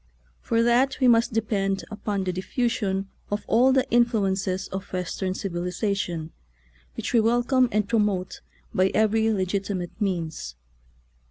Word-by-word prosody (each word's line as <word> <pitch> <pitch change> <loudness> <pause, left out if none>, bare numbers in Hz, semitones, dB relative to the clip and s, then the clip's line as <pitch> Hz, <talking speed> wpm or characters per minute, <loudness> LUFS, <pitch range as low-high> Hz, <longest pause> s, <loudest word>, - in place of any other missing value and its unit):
For 230 0 +1
that 245 +4 +2
we 260 - +4
must 230 -1 +4
depend 200 -3 -1
upon 205 -2 -2
the 185 -1 -2
diffusion 195 0 -1 0.2
of 205 +1 -3
all 245 +4 +4
of 265 - +3
the 265 0 +2
influences 195 -5 +1
of 190 +1 -6
Western 185 +1 -3
civilization, 180 -2 -2 0.7
which - - -3
we 235 - +6
welcome 240 +3 +3
and 210 -2 +1
promote 205 -5 0 0.3
by 185 +1 +3
every 220 +1 +3
legit 195 -1 -1
imate 180 -4 -3
means. 165 - -3
205 Hz, 140 wpm, -25 LUFS, 185-230 Hz, 0.7 s, we